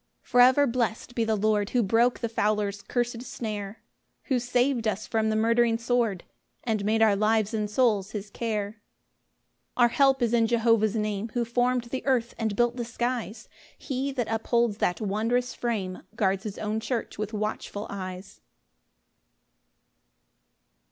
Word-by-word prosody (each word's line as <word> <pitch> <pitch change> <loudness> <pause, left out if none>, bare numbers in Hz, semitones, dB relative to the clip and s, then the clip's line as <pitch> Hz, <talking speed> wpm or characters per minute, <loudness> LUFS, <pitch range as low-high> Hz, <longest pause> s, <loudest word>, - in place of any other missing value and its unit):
4 - - -24
For 245 - +6
ever 260 +3 +5
blessed 235 -1 -2
be 235 - 0
the 220 -1 +1
Lord, 210 0 +1
Who 245 -2 +2
broke 230 +5 +2
the 235 - 0
fowler's 210 -2 0
cursed 240 0 -2
snare, 215 -4 -6 0.4
Who 260 -3 0
sav'd 245 0 +1
us 215 0 -1
from 220 -1 0
the 215 - 0
murdering 230 +1 +3
sword, 230 -5 0 0.4
And 220 -4 -1
made 220 +2 +2
our 215 -2 +5
lives 215 +1 +1
and 210 -1 -1
souls 210 -4 +2
his 205 -1 -6
care. 215 -2 -3 0.9
5 - - -49
Our 240 -1 +6
help 270 0 +3
is 235 0 +1
in 230 -1 +4
Jehovah's 230 -2 +2
Name, 210 0 -2
Who 240 -1 +1
form'd 245 +1 +1
the 250 +2 -5
earth 245 -3 +1
and 220 -3 -1
built 240 +2 +1
the 240 - -2
skies; 240 -2 -3 0.3
He 270 0 -3
that 245 -4 -2
upholds 225 -1 +1
that 180 -2 0
wondrous 225 +5 0
frame 200 -6 -3
Guards 195 -2 0
his 210 -2 -5
own 215 +1 -2
church 230 -1 -4
with 215 0 -3
watchful 210 -1 -4
eyes. 185 -1 -7
225 Hz, 160 wpm, -27 LUFS, 210-240 Hz, 0.9 s, For